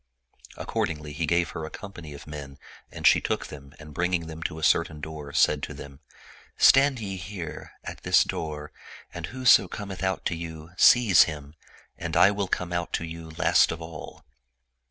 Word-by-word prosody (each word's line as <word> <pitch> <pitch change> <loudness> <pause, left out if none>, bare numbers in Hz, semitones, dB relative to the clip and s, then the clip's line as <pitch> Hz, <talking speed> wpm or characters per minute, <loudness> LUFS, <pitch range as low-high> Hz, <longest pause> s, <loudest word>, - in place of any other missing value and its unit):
Accordingly, 75 -1 -3
he 80 +1 -2
gave 85 +1 +2
her 80 - -6
a 80 - -5
company 85 -6 -10
of 70 - -11
men 70 -2 -8 0.3
and - - -7
she - - +6
took - - -2
them 70 -2 -11
and 75 -1 -12
bringing 90 +1 0
them 80 0 -8
to 80 - -4
a 80 - -7
certain 80 -1 +2
door, 75 -1 -7
said 75 +1 +3
to - - -6
them, 70 -1 -11 0.3
" - - -23
Stand 135 -1 +5
ye 100 -3 -5
here, 90 -2 -7
at - - -8
this - - +4
door, 75 -1 -5 0.4
and - - -5
whoso 130 -2 +4
cometh 100 -3 -7
out 95 0 -1
to 85 - 0
you, 80 -1 -8
seize 110 -2 +6
him; 75 -2 -7 0.5
and - - -2
I 100 - +7
will 100 -1 -2
come 90 -1 -2
out 85 -1 -3
to 85 - -1
you 80 0 -8
last - - +4
of 80 - -5
all." 80 -2 -10
80 Hz, 190 wpm, -26 LUFS, 75-90 Hz, 0.5 s, I